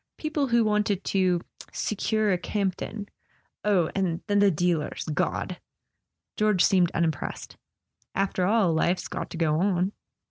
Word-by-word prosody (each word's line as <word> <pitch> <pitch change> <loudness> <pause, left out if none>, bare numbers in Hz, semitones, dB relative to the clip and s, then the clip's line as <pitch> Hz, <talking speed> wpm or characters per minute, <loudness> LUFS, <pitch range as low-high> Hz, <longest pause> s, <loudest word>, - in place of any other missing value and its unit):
People 305 -2 -1
who 235 -1 +3
wanted 210 -2 +1
to 185 -3 +1 0.3
'secure 215 0 0
a - - +1
Campton.' 200 +2 -3 0.6
Oh, 190 -6 +2
and 180 -4 -1
then 205 -1 +2
the 200 0 +6
dealers—God! 160 -3 -1 0.4
" - - -59
George 210 -4 +4
seemed 180 -3 +4
unimpressed. 160 -4 -2 0.6
"After 195 -2 0
all, 205 -5 +3
life's 175 +3 +1
got - - -5
to - - -7
go 155 -2 +1
on." 185 0 +1
190 Hz, 135 wpm, -26 LUFS, 175-210 Hz, 0.6 s, the